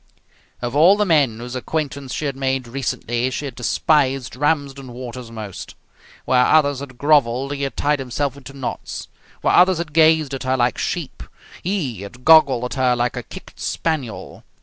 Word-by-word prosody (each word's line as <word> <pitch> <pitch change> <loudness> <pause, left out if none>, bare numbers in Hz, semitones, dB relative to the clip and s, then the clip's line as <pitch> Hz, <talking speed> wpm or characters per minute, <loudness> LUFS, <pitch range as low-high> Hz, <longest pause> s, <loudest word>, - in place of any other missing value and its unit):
Of 120 +2 -3
all 175 +7 +6
the 210 - +2
men 145 - +3
whose 120 +2 -7
acquaintance 140 0 -3
she 155 - -3
had 140 -2 -2
made 135 -2 -1
recently 120 -1 -2
she 140 +3 -4
had 135 - -5
despised 135 +1 +1
Ramsden 140 -2 -1
Waters 125 -1 -8
most. 110 -4 -8 0.5
Where 125 -1 +4
others 145 -1 +3
had 135 -3 -9
grovelled 140 -2 +2
he 140 - -5
had 135 -1 -3
tied 145 0 +1
himself 135 +1 -2
into 140 -1 -12
knots. 135 -2 -6 0.3
Where - - +2
others 180 0 +5
had 165 -3 -5
gazed 160 -2 +4
at 135 - -4
her 130 0 0
like 120 -2 +1
sheep - - -3 0.4
he 155 - -2
had 120 +5 -11
goggled 140 -6 +6
at 125 - -4
her 125 -1 +3
like 120 +1 -1
a 125 - -3
kicked - - -12
spaniel. 150 -9 -3
135 Hz, 175 wpm, -21 LUFS, 125-150 Hz, 0.5 s, all